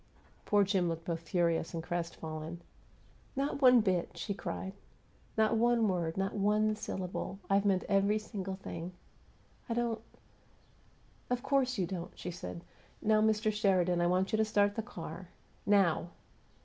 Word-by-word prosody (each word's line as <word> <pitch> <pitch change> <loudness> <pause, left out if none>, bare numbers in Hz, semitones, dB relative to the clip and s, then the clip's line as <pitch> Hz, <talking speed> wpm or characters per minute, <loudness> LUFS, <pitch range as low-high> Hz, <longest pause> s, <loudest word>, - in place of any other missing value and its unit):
Poor 205 -1 +4
Jim 190 -3 +1
looked 165 0 -4
both 170 -2 -2
furious 170 -1 +1
and 165 - -3
crestfallen. 165 -1 -4 0.8
"Not 280 +1 -1
one 250 -2 +8
bit!" 185 -4 0
she 200 - -2
cried. 190 0 -5 0.6
"Not 220 +1 +3
one 235 -1 +3
word! 175 -3 -1
Not 195 0 0
one 210 +1 +2
syllable! 190 -2 -4
I've 200 +1 +4
meant 190 -2 +3
every 200 +1 +3
single 195 -3 -5
thing!" 180 -2 -6 0.8
"I 230 - 0
don't 235 -2 0 0.7
" - - -32
"Of 250 0 -1
course 270 -2 +2
you 185 - +1
don't!" 175 -1 -5
she 180 - -5
said. 170 0 -7 0.4
"Now, 215 0 +3
Mr. 215 0 +2
Sheridan, 185 -4 +2
I 175 - +3
want 185 +2 +1
you - - +4
to 220 - +4
start 205 -1 +2
the 225 - -2
car. 240 +3 -8 0.4
Now! 195 -4 +3
195 Hz, 155 wpm, -32 LUFS, 175-215 Hz, 0.8 s, one